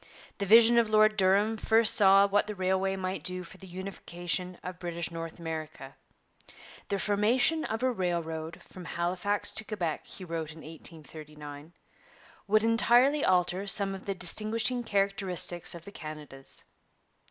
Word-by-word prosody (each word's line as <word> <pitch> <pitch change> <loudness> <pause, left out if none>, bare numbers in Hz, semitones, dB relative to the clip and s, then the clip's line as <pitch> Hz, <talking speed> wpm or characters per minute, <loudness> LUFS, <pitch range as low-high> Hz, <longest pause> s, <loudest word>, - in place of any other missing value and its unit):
The 200 - -2
vision 230 +3 +7
of 230 -2 +1
Lord 215 0 +4
Durham 205 +3 +2
first 225 0 +4
saw 195 -1 +6
what 205 +1 +1
the 210 - -5
railway 190 +1 0
might 185 0 -4
do 180 0 -1
for 170 - -14
the 190 - -12
unification 180 -1 -4
of 180 0 -7
British 170 -1 -4
North 165 -1 -6
America. 155 -5 -7 0.9
'The 200 - 0
formation 230 +11 +2
of 220 +2 -3
a 260 - +3
railroad 165 -5 -3
from 180 -2 -11
Halifax 180 +5 -1
to 220 - -1
Quebec,' 180 -8 -4
he 185 - -9
wrote 165 -2 -4
in 160 - -13
1839, 155 -1 -10 0.7
'would 215 +1 +3
entirely 240 +6 +4
alter 185 +1 +1
some 195 0 +2
of 190 0 -9
the 195 - -1
distinguishing 220 +7 -1
characteristics 195 -5 0
of 170 0 -11
the 200 - -10
Canadas.' 150 -6 -10
190 Hz, 150 wpm, -29 LUFS, 170-210 Hz, 0.9 s, vision